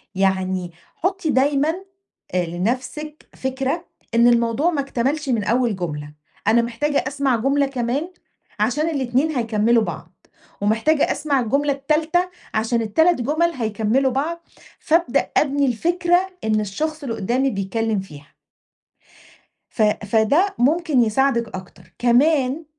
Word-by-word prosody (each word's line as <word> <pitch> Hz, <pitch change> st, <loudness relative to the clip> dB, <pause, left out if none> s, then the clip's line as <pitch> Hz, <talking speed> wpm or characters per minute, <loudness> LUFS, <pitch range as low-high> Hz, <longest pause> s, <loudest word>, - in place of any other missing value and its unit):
يعني 190 Hz, -2 st, 0 dB, 0.2 s
حُطّي 370 Hz, -2 st, -1 dB
دايمًا 285 Hz, +3 st, +2 dB, 0.6 s
آآ 180 Hz, -1 st, +1 dB
لنفسِك 255 Hz, -, -4 dB
فكرة 265 Hz, +6 st, -2 dB, 0.3 s
إن 235 Hz, +1 st, +6 dB
الموضوع 235 Hz, +6 st, +2 dB
ما 290 Hz, -, 0 dB
اكتملش 275 Hz, +2 st, -2 dB
من 230 Hz, -4 st, +1 dB
أول 235 Hz, 0 st, +1 dB
جملة، 150 Hz, -5 st, -5 dB, 0.3 s
أنا 230 Hz, +2 st, +5 dB
محتاجة 280 Hz, +5 st, -1 dB
أسمَع 275 Hz, -2 st, 0 dB
جملة 275 Hz, +5 st, +1 dB
كمان 270 Hz, +6 st, -2 dB, 0.5 s
عشان 285 Hz, +9 st, +1 dB
الإتنين 270 Hz, 0 st, 0 dB
هيكمّلوا 230 Hz, -1 st, +2 dB
بعض، -, -, -7 dB, 0.5 s
ومحتاجة 225 Hz, +9 st, +2 dB
أسمَع 285 Hz, -1 st, 0 dB
الجملة 280 Hz, +4 st, +1 dB
التالتة 315 Hz, +6 st, 0 dB, 0.2 s
عشان 225 Hz, +2 st, 0 dB
ال3 255 Hz, +7 st, +2 dB
جُمَل 315 Hz, +7 st, +1 dB
هيكمّلوا 230 Hz, +2 st, 0 dB
بعض، 335 Hz, +6 st, -3 dB, 0.3 s
فابدأ 335 Hz, +2 st, +1 dB
أبني 285 Hz, -1 st, +2 dB
الفكرة 345 Hz, +8 st, +1 dB
إن 215 Hz, -1 st, +1 dB
الشخص 305 Hz, +10 st, -3 dB
اللي 235 Hz, -5 st, -3 dB
قُدّامي 250 Hz, +7 st, 0 dB
بيتكلّم 210 Hz, +1 st, -1 dB
فيها. 150 Hz, -6 st, -10 dB, 1.4 s
ف 225 Hz, -, -1 dB
فده 220 Hz, -, +2 dB
ممكن 295 Hz, 0 st, +2 dB
يساعدِك 235 Hz, 0 st, +1 dB
أكتر، 180 Hz, -1 st, -13 dB
كمان 270 Hz, +4 st, +2 dB
260 Hz, 120 wpm, -21 LUFS, 220-300 Hz, 1.4 s, إن